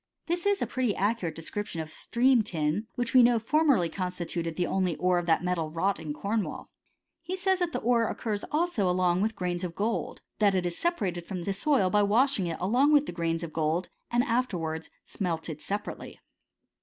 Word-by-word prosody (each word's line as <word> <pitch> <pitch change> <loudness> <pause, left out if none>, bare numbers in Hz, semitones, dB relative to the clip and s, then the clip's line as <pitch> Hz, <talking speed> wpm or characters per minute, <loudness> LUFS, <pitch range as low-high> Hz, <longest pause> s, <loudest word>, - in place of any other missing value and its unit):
This 345 +3 -1
is 405 -1 +2
a - - +1
pretty 250 -5 -1
ac* 215 +4 +1
curate 165 -3 -3
description 170 +2 -5
of 160 -1 -5
stream 245 +8 +2
tin, 175 +1 -1
which 240 -1 -2
we 255 - +8
know 240 0 +5
for 300 +8 +1
merly 230 - +3
constituted 175 -3 -3
the 175 - 0
only 185 -2 0
ore 180 +1 +2
of 175 - -5
that 165 +1 +3
metal 180 -3 0
wrought 170 +5 0
in 155 -2 -5
Cornwall. 200 +7 -3 0.5
He 345 +3 -4
says 380 0 +1
that 350 -2 0
the - - -3
ore 230 -1 +3
occurs 210 -2 -3
also 300 - +1
along 180 0 +2
with 220 +1 0
grains 180 0 -2
of 175 -2 -4
gold; 220 +5 -2 0.2
that 205 -2 +4
it 180 -1 +1
is 175 -1 -2
separated 190 - -2
from 185 -3 -4
the 195 - -1
soU 265 -1 +2
by 210 - +4
washing 205 -3 +2
along 245 - +2
with 295 -1 +5
the - - -5
grains 165 -1 -1
of 160 -2 -6
gold, 160 +3 0 0.2
and 240 +1 +2
after 245 -5 0
wards 160 -1 -4 0.2
smelted 165 -5 -4
separately. 205 +1 -5
195 Hz, 205 wpm, -28 LUFS, 170-240 Hz, 0.5 s, we